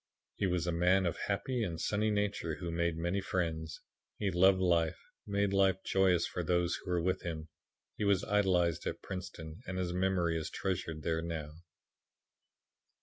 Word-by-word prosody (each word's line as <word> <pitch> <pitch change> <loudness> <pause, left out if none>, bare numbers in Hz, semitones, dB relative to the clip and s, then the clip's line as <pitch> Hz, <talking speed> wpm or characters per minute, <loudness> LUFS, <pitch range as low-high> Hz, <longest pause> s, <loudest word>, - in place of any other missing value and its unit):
He 100 - +1
was 90 -2 0
a 85 - 0
man 90 +3 +3
of 85 - 0
happy 120 +5 -1
and 85 -7 -2
sunny 105 +4 +1
nature 100 -6 -1
who 85 0 -5
made 85 0 0
many 85 +4 0
friends. 80 -4 -2 0.4
He 100 -2 0
loved 95 +2 +5
life 85 -3 +2 0.3
and 100 - -4
made 100 -1 +2
life 95 -1 +4
joyous 95 -3 +3
for 90 - -3
those 85 0 +1
who - - -9
were 90 -1 +1
with 90 +1 0
him. 80 -2 -5 0.5
He - - -2
was 100 -1 +3
idolized 95 -5 +2
at - - -4
Princeton 85 -4 -7
and 95 0 -3
his 90 -1 -1
memory 90 -3 +1
is 80 - -4
treasured 80 -5 -3
there 80 -1 0
now. 80 -3 -4
90 Hz, 175 wpm, -33 LUFS, 85-95 Hz, 0.5 s, loved